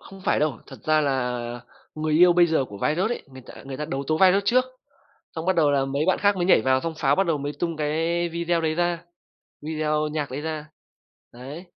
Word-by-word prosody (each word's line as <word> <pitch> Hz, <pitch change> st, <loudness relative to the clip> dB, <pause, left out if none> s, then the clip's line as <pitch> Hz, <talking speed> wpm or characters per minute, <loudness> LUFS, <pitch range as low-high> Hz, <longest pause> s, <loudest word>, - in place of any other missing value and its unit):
không 195 Hz, 0 st, -13 dB
phải -, -, +1 dB
đâu, 150 Hz, -6 st, 0 dB
thật -, -, -12 dB
ra 155 Hz, 0 st, +3 dB
là 130 Hz, -4 st, -1 dB, 0.5 s
người 155 Hz, 0 st, -2 dB
yêu 175 Hz, +2 st, +7 dB
bây 175 Hz, 0 st, +5 dB
giờ 160 Hz, -5 st, +1 dB
của 100 Hz, -4 st, -11 dB
Viruss 180 Hz, -, 0 dB
ấy, -, -, -5 dB
người 130 Hz, -1 st, -11 dB
ta -, -, -12 dB
người 135 Hz, -1 st, -7 dB
ta 150 Hz, -, -4 dB
đấu 140 Hz, -2 st, -4 dB
tố 155 Hz, 0 st, 0 dB
Viruss 190 Hz, +2 st, +5 dB
trước, 255 Hz, +3 st, +4 dB, 0.7 s
xong 160 Hz, +1 st, -4 dB
bắt 190 Hz, -, +2 dB
đầu 150 Hz, -3 st, +3 dB
là 135 Hz, -1 st, +2 dB
mấy 140 Hz, +3 st, -1 dB
bạn 185 Hz, -, +2 dB
khác 200 Hz, 0 st, +3 dB
mới 175 Hz, -1 st, -1 dB
nhảy 180 Hz, -, +5 dB
vào, 130 Hz, +1 st, +2 dB
xong 165 Hz, -1 st, -3 dB
Pháo 140 Hz, -1 st, +2 dB
bắt 195 Hz, -, +2 dB
đầu 165 Hz, -4 st, +1 dB
mới 145 Hz, +1 st, -4 dB
tung 170 Hz, -2 st, -2 dB
cái 165 Hz, +3 st, 0 dB
video 170 Hz, 0 st, -1 dB
đấy 155 Hz, -1 st, 0 dB
ra, 175 Hz, 0 st, -1 dB, 0.6 s
video 155 Hz, 0 st, -1 dB
nhạc 150 Hz, -2 st, -3 dB
đấy 135 Hz, +3 st, -4 dB
ra, 155 Hz, -1 st, -5 dB, 0.7 s
đấy. 135 Hz, +8 st, -9 dB
155 Hz, 235 wpm, -24 LUFS, 145-175 Hz, 0.7 s, yêu